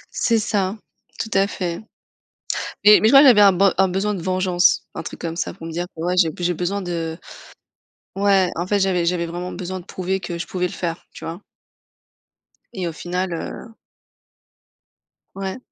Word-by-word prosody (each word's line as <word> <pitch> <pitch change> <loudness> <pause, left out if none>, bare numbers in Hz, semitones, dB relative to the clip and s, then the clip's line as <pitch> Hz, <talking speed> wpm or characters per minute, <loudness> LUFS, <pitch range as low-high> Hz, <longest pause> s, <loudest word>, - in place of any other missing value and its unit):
C'est 230 -1 +2
ça, 205 -2 -1 0.4
tout 220 - -4
à 195 0 +3
fait. 175 -4 -4 1.1
Mais 210 0 +9
mais 220 - +3
je - - +3
crois 275 - +10
que 285 - +8
j'avais 215 -4 +7
un 200 -1 +7
be 190 +1 +3
un 190 - +5
besoin 195 +3 -1
de 180 - -5
vengeance, 185 0 +2
un - - -5
truc - - -8
comme 165 -1 -4
ça 170 - -3
pour 165 -3 -10
me - - -6
dire 175 +2 -3
que 160 - -7
ouais, 180 +2 0
j'ai 170 -3 +4
j'ai 175 0 0
besoin 185 +4 -2
de 165 -2 -3 1.0
Ouais, 195 -2 +3
en 175 +2 -2
fait 205 0 +1
j'avais 180 -3 +1
j'avais 170 0 0
vraiment 175 +2 -5
besoin 185 +1 -5
de 175 - -13
prouver 190 0 -3
que 175 -2 -5
je 170 - -4
pouvais 180 +2 -2
le - - -9
faire, 170 -2 -4
tu - - -11
vois? 165 +2 -5 1.3
Et 185 -4 -3
au - - -3
final, 180 +3 -3
heu 220 +6 -7 1.6
Ouais. 195 +1 -4
185 Hz, 195 wpm, -21 LUFS, 175-195 Hz, 1.6 s, crois